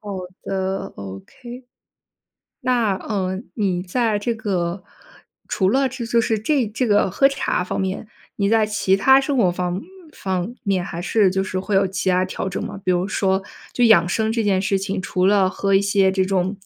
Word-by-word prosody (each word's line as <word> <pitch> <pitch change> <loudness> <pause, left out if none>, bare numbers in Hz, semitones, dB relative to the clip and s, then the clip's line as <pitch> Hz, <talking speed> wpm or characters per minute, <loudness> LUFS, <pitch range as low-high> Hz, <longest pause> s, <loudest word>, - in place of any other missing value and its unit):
好 205 -1 -8 0.3
的 190 0 -3
，OK。 170 - -10 1.0
那， 245 -6 +1
嗯， 190 0 -3
你 185 -5 0
在 215 +2 0
这 230 +3 -1
个， 185 -4 -2 0.7
除 190 -2 +1
了 270 +2 +2
这 255 -2 -6
就 235 0 +2
是， 220 -1 0
这 255 +2 +1
这 230 +4 -2
个 205 -3 +3
喝 275 +8 +4
茶 275 -8 -1
方 185 - -3
面， 190 +3 -3 0.3
你 200 -1 +1
在 220 -1 +4
其 195 -2 +1
他 265 +6 +5
生 275 0 -1
活 195 -7 +3
方 180 +1 -2 0.3
方 190 +4 -3
面 190 -4 0
还 170 0 -6
是， 195 -1 +3
就 190 +1 0
是 185 0 -3
会 200 +1 -3
有 195 0 +4
其 185 0 -2
他 180 +1 +2
调 190 +1 -4
整 190 - -4
吗？ 195 - -7
比 185 - 0
如 180 +2 0
说， 190 -2 0 0.3
就 245 - +2
养 180 -7 +6
生 220 +3 0
这 230 -1 0
件 195 -2 +2
事 195 0 +1
情， 195 0 -3
除 185 0 0
了 195 -2 +4
喝 195 +1 0
一 195 - +4
些 195 -1 +3
这 190 0 +1
种 190 +1 0
195 Hz, 210 characters per minute, -21 LUFS, 185-220 Hz, 1.0 s, 养